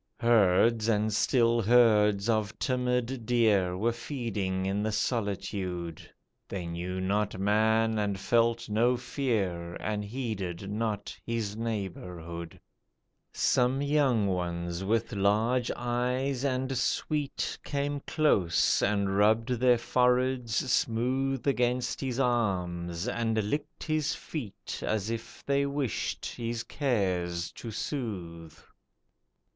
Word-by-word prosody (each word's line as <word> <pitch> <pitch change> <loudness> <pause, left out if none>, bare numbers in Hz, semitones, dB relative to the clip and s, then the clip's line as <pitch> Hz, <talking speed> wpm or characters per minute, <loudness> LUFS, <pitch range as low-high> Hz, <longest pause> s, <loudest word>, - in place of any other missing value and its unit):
Herds, 115 0 +4
and 105 0 +1
still 115 +1 +3
herds, 105 -3 +4
of 110 -3 0
timid 125 -1 -1
deer 105 -7 +3
Were 115 +5 +1
feeding 115 -7 -3
in 100 +2 0
the 110 +1 0
solitude, 95 -7 -2 0.4
They 95 -3 -4
knew 90 +2 -4
not 100 +1 0
man, 110 +2 +2
and 100 -2 -1
felt 115 +2 +2
no 120 +4 +2
fear, 110 -10 -2
And 105 0 -3
heeded 100 -5 -4
not 105 -1 -2
his 115 -3 -2
neighbourhood, 90 -6 -5 0.7
Some 125 +2 +2
young 140 -7 +2
ones 85 -1 -2
with 115 +3 0
large 110 +5 +2
eyes 125 +2 -1
and 130 -1 0
sweet 145 +3 -1
Came 145 0 -2
close, 120 - +2
and 100 -1 +1
rubbed 110 +3 +3
their 125 0 +4
foreheads 125 0 +1 0.2
smooth 130 +3 0
Against 125 -2 0
his 130 -2 -2
arms, 90 -9 0
and 110 -3 0
licked 145 0 -3
his 155 -2 0
feet, 125 -11 -6
As 110 0 -1
if 115 0 -7
they 140 0 +2
wished 140 -4 -2
his 115 0 -4
cares 90 - -1
to 115 - -8
soothe. 90 - -5
110 Hz, 110 wpm, -29 LUFS, 95-125 Hz, 0.7 s, Herds